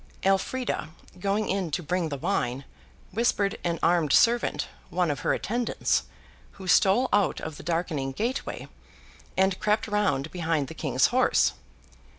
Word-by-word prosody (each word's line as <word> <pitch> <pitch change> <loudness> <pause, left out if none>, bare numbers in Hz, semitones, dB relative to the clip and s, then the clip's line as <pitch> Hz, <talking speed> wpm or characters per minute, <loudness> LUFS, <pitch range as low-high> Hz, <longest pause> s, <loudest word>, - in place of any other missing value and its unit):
Elfrida, 195 +4 0 0.3
going 200 +3 0
in 190 -3 -1
to 165 +4 -2
bring 175 +1 -1
the 140 - -4
wine, 130 0 -1 0.5
whispered 210 -3 +1
to - - -7
an 170 -1 0
armed 170 -5 +3
servant, 235 0 +3 0.2
one 175 -2 +1
of 140 - -3
her - - 0
attendants, 240 +3 0 0.5
who 190 - -10
stole 195 +8 +4
out 205 -2 +2
of 160 -2 -6
the - - -9
darkening 160 -4 -1
gateway, 235 - -3 0.7
and 190 0 +2
crept 210 +1 +1
round 190 -9 0
behind 160 -6 -1
the - - -7
King's - - +1
horse. - - +3
185 Hz, 150 wpm, -27 LUFS, 160-210 Hz, 0.7 s, stole